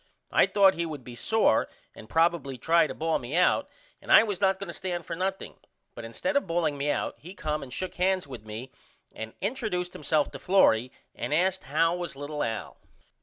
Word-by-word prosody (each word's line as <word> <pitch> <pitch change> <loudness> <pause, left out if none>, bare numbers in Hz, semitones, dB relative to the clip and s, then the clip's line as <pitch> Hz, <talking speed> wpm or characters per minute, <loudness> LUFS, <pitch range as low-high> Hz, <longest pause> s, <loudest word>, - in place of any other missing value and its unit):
I - - +5
thought 195 -2 +5
he 170 0 -2
would 150 -5 -7
be 120 0 -9
sore 215 - +2 0.2
and 110 - -13
probily 165 -3 +1
try 165 +4 +4
to - - -7
ball 160 0 0
me 125 +5 -5
out 180 - +3 0.3
and - - -6
I - - +9
was 205 -4 -3
not 190 -1 +3
going 200 - -7
to - - -5
stand 175 -3 -4
for 165 - -4
nothing 190 +2 -3 0.4
but 120 - -9
instead 115 - -3
of 280 - +2
balling 165 -3 0
me 140 +1 -2
out - - -2
he 180 +5 -11
come 150 -4 -2
and 135 - -9
shook 185 +8 -4
hands 185 0 +1
with 125 -6 -9
me 110 +4 -8 0.4
and 110 0 -7
interduced 200 -5 -2
himself 150 0 0
to - - -8
Florrie 125 -11 +3 0.2
and 150 - -2
asked 185 +3 +1
how 165 +5 +2
was 175 -4 -4
little 145 +1 -5
Al. 110 -1 -4
165 Hz, 210 wpm, -27 LUFS, 140-185 Hz, 0.4 s, I